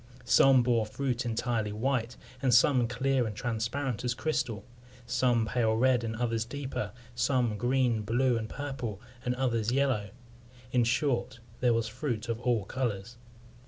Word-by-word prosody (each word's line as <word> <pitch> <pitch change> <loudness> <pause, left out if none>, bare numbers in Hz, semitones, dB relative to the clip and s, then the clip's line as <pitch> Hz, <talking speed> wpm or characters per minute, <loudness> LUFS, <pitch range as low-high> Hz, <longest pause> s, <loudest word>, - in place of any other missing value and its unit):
Some 130 +1 +6
bore 115 -3 +2
fruit 125 +1 -2
entirely 115 -2 -1
white, 120 +2 -1 0.2
and 130 -2 +2
some 125 0 +5
clear 130 +1 0
and 105 - -5
transparent 120 +3 -2
as 125 0 -1
crystal; 115 -9 -2 0.4
some 120 -1 +2
pale 110 -1 +1
red, 125 0 +3
and 110 -1 -3
others 115 -1 0
deeper; 130 -4 -4 0.2
some 120 -1 +1
green, 120 0 +1
blue, 120 +4 +1
and 110 -1 -3
purple, 130 -8 -5 0.2
and 125 -1 -1
others 120 -4 0
yellow; 130 -6 +1 0.6
in 125 -2 +3
short, 125 0 0 0.2
there 120 -2 +3
was 115 -1 0
fruit 120 -1 -4
of 115 -1 -1
all 120 -5 0
colours. 115 -2 -3
120 Hz, 150 wpm, -29 LUFS, 115-130 Hz, 0.6 s, Some